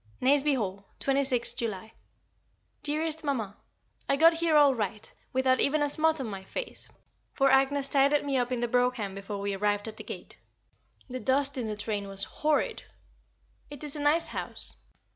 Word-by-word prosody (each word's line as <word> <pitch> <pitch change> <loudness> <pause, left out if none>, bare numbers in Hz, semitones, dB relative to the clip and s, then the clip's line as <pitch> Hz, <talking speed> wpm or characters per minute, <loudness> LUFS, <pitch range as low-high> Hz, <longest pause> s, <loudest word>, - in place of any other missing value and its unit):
Nazeby 280 +2 +3
Hall, 200 -3 -4
26th 270 -3 +2
July. 220 -2 -4 0.9
Dearest 310 +2 0
Mamma, 230 -9 -2 0.5
I 275 - +4
got 330 +4 +6
here 330 -1 +1
all 290 -2 +6
right, 215 -2 -4 0.2
without 260 0 +2
even 295 +1 +2
a 290 - 0
smut 315 0 +2
on 265 - -3
my 195 -3 -6
face, - - -6 0.5
for 275 -1 +3
Agnès 275 +1 +3
tidied 280 +1 +3
me 280 -1 -1
up 245 -1 0
in 245 -2 -1
the 240 - 0
brougham 245 -4 0
before 195 +1 -6
we 200 0 -2
arrived 205 +1 -1
at 220 0 -8
the - - -8
gate. - - -9 0.7
The 255 -1 -5
dust 275 +2 +2
in 245 -4 -3
the 210 -1 -4
train 205 -1 -3
was 195 0 -2
horrid. 300 +6 -1 0.9
It 290 0 -8
is 295 -1 -3
a 295 - -4
nice 305 +3 +4
house. - - -5
260 Hz, 175 wpm, -28 LUFS, 215-290 Hz, 0.9 s, got